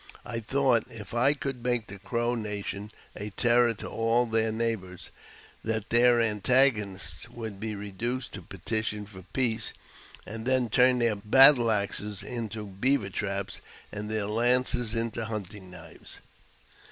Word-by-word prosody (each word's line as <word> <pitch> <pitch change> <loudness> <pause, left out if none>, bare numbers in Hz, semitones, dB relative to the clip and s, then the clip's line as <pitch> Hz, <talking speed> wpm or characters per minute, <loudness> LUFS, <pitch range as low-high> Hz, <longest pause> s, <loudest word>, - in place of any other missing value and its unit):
I 115 - -3
thought, 125 0 +2
if 110 -2 -8
I 130 +5 +3
could 135 -3 -4
make 120 -2 0
the 100 0 -10
Crow 120 +4 -1
nation 105 -2 -4 0.3
a 105 0 -5
terror 120 +2 +3
to - - -7
all 115 +2 +1
their 110 -1 +1
neighbours, 110 -6 -3 0.5
that 110 -1 -2
their 120 +1 +5
antagonists 105 -5 +1
would 110 -4 -7
be 110 0 -4
reduced 115 +6 -4
to 100 - -6
petition 105 +4 -3
for 95 -2 -12
peace, 115 -4 0 0.5
and 110 +3 -7
then 130 -2 +2
turn 125 +3 +4
their^ 115 -4 +1
battle 130 +1 +7
axes 105 -1 -1
into 110 -3 -5
beaver 100 +2 +1
traps, 100 -1 -3 0.3
and 105 0 -5
their 110 -1 -1
lances 120 +1 +1
into 115 0 -2
hunti] 105 -2 -5
knives. 90 -3 -12
110 Hz, 140 wpm, -28 LUFS, 105-120 Hz, 0.5 s, battle